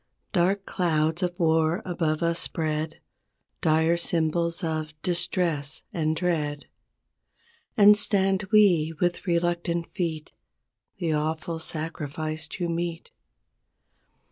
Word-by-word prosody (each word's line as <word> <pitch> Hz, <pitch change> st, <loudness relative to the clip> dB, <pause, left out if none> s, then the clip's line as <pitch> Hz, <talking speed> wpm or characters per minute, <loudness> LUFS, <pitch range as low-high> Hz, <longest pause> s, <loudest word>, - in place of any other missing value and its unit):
Dark 195 Hz, +2 st, +1 dB
clouds 160 Hz, -2 st, 0 dB
of 175 Hz, -1 st, -2 dB
war 160 Hz, 0 st, +2 dB
above 165 Hz, -3 st, -1 dB
us 170 Hz, 0 st, +2 dB
spread. 155 Hz, -1 st, -1 dB, 0.6 s
Dire 160 Hz, +1 st, +3 dB
symbols 170 Hz, 0 st, 0 dB
of 155 Hz, -1 st, -3 dB
distress 175 Hz, -4 st, 0 dB
and 155 Hz, -2 st, 0 dB
dread; 155 Hz, -4 st, -1 dB, 1.1 s
And 210 Hz, 0 st, +8 dB
stand 195 Hz, -1 st, +2 dB
we 175 Hz, -7 st, +4 dB
with 175 Hz, +2 st, -1 dB
reluctant 170 Hz, 0 st, -1 dB
feet 160 Hz, -5 st, -3 dB, 0.7 s
The 170 Hz, -4 st, -1 dB
awful 160 Hz, +2 st, -2 dB
sacrifice 155 Hz, -1 st, -3 dB
to 175 Hz, +2 st, -4 dB
meet. 170 Hz, 0 st, -4 dB
165 Hz, 100 wpm, -26 LUFS, 155-175 Hz, 1.1 s, And